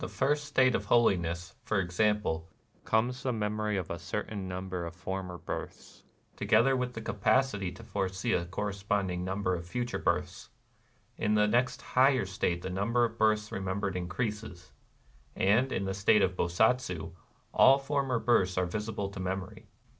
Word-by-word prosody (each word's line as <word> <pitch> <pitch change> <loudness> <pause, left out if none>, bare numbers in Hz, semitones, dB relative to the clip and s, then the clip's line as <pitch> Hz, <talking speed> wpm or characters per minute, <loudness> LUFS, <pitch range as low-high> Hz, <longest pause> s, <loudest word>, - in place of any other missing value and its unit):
254 - - -3
NIRVANA 135 - -1
first 145 0 -1
state 130 -2 +3
of - - -2
holiness, 90 -7 +2
for 110 - 0
example, 90 -3 0 0.4
comes 120 +3 +1
the 130 - -1
memory 105 -2 -1
of 90 -4 -4
a 85 - -4
certain 100 +2 -4
nmnber 90 -1 -4
of 85 - -9
former 95 0 -5
births, - - -7 0.3
together 135 +3 +3
with 125 -1 -2
the 115 - -5
capacity 105 -2 +1
to 90 - -12
foresee 95 +4 -2
a 85 - +1
corre 100 +4 -3
sponding 100 -2 -1
number 95 0 -1
of 85 -1 -3
future 120 +8 -3
births; 90 0 -2 0.3
— - - -38
in 105 - +2
the 105 0 +4
next 120 +3 +1
higher 130 -2 +3
state 90 -2 -2
the - - -3
number 115 +6 +1
of 115 0 -6
births 105 -1 +2
remem 95 +1 -3
bered 100 -2 -2
increases; 95 0 -4 0.3
— - - -32
and 110 +7 +3
in 100 - -1
the 95 - -2
state 100 +1 +4
of 95 - +1
Bosatsu 90 -2 +1 0.4
all 135 +1 +7
former 135 -2 -1
births 100 -6 +2
are 90 - +2
visible 105 +1 -3
to 100 - -9
memory. 95 +3 -4
100 Hz, 175 wpm, -30 LUFS, 90-115 Hz, 0.4 s, all